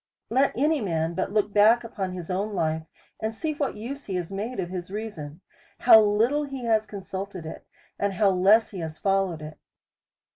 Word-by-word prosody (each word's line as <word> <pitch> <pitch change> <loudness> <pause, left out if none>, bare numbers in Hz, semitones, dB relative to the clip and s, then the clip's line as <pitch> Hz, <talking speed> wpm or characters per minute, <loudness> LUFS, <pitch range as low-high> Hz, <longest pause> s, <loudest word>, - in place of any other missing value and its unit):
Let 265 +2 +2
any 300 +2 +2
man 165 -4 -1
but 170 - -2
look 210 -1 0
back 220 +4 +5
upon 195 -5 -4
his 180 -1 -6
own 200 +3 -2
life, 160 -2 -1 0.3
and 220 +1 -3
see 310 +5 -2
what 290 -2 -2
use 270 +7 -7
he 195 - -4
has 180 0 -3
made 210 +4 -4
of 175 -1 -3
his 180 -1 -5
reason, 185 -7 -6 0.4
how 225 -3 +9
little 225 +8 +2
he 270 -3 -7
has 220 -2 +2
consulted 195 -3 -6
it, 160 - -9 0.3
and 200 -1 0
how 195 +1 +3
less 195 +5 +4
he 195 - -6
has 160 -1 -5
followed 195 -5 0
it. 155 0 -9
200 Hz, 190 wpm, -26 LUFS, 180-225 Hz, 0.4 s, how